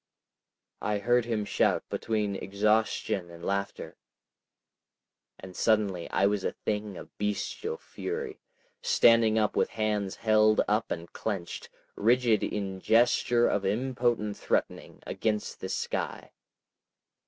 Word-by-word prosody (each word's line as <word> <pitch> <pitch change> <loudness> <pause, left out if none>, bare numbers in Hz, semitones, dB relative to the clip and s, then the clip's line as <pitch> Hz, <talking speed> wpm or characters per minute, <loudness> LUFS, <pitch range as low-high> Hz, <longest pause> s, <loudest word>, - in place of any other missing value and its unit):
I 105 -1 0
heard 120 +3 +2
him 110 -3 -1
shout - - +1
between 105 -3 -1
exhaustion 105 -1 0
and 85 0 -10
laughter.... 100 0 -3 1.4
And 95 -1 -11
suddenly 100 -6 +1
I - - +2
was 100 -1 +1
a - - -1
thing 105 -2 -3
of - - -11
bestial 105 - -2
fury, 440 -2 -5 0.4
standing 115 - +5
up 110 -1 +1
with - - +2
hands 105 -3 -1
held 110 -1 +3
up 105 +2 +1
and 85 +1 -5
clenched, 95 -6 -4 0.3
rigid 115 -1 +3
in 95 -2 -3
gesture 120 +2 +3
of 100 - 0
impotent 120 0 0
threatening, - - -2
against 105 -2 -2
the - - -5
sky. - - -3
105 Hz, 120 wpm, -28 LUFS, 100-115 Hz, 1.4 s, standing